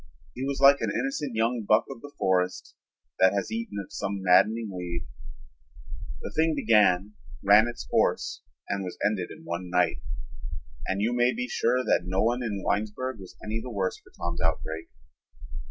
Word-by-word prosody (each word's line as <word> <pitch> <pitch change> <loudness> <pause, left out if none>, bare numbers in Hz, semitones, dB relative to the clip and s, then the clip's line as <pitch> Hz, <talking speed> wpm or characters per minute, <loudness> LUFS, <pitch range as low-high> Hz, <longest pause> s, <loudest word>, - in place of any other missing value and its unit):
He 125 - -5
was 140 0 -2
like 140 +1 +7
an - - 0
innocent 265 - -2
young 115 +2 +1
buck 110 +1 +4
of 115 - -9
the 145 - -10
forest 90 -1 0 0.5
that 95 0 +6
has 100 - -1
eaten 230 - -4
of 100 -2 -6
some 100 -1 -3
maddening 105 +4 +4
weed. 85 -2 -4 1.2
The - - -5
thing 160 0 +3
began, 105 -6 +3 0.3
ran 105 +3 +7
its 120 - -6
course, - - +1 0.3
and 100 -1 -2
was 90 - -6
ended 105 -4 0
in - - -11
one 85 +1 -4
night, 90 -6 +2 0.9
and 95 +2 0
you 115 +3 +1
may 120 - +3
be 245 +1 -2
sure 125 - +1
that 90 - +2
no 95 +1 0
one 120 +3 +1
in 105 -5 -3
Winesburg 110 +4 -1
was 95 -2 -11
any 110 +1 -3
the 125 - -7
worse 95 -5 -1
for - - -21
Tom's 85 0 -3
outbreak. 80 0 -2
105 Hz, 175 wpm, -27 LUFS, 95-120 Hz, 1.2 s, like